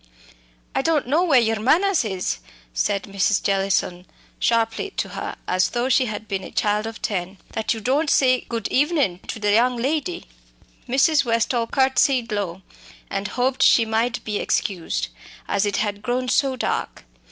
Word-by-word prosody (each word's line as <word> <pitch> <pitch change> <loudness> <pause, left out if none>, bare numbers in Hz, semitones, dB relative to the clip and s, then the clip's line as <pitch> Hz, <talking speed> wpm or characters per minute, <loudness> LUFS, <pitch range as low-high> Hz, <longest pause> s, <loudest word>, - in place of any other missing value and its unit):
"I - - +1
don' 305 -3 +1
know 305 +7 +2
where 295 -8 +5
yur 225 -2 +1
manners 345 - +3
is," 190 - -2 0.3
said 195 - 0
Mrs. 200 +1 0
Jellison 195 -2 0 0.3
sharply 230 - +1
to - - -1
her, - - -5
as 185 0 +2
though 245 +1 -1
she 260 0 +4
had 215 0 -6
been 195 -1 -3
a - - -8
child 210 +1 0
of 225 - -9
ten, 190 -1 -3
"that 220 +1 -1
you - - -5
don't 280 +7 +1
say 255 -2 +4
good 230 -3 -2
evenin' 280 - +1
to - - -4
the 210 -1 +1
young 240 +3 +3
lady." 310 +8 -2 0.6
Mrs. 280 +4 +4
Westall 230 0 0
curtsied 265 -2 +2
low, 190 -3 -3 0.5
and 195 +1 -2
hoped 255 +1 -1
she 230 - +6
might 230 +2 -1
be 210 -1 -2
excused, 180 - -1 0.4
as 200 +1 +1
it 200 - -1
had 205 -1 -2
grown 250 +3 -1
so 270 0 +2
dark. 255 - -3
230 Hz, 165 wpm, -22 LUFS, 205-260 Hz, 0.6 s, she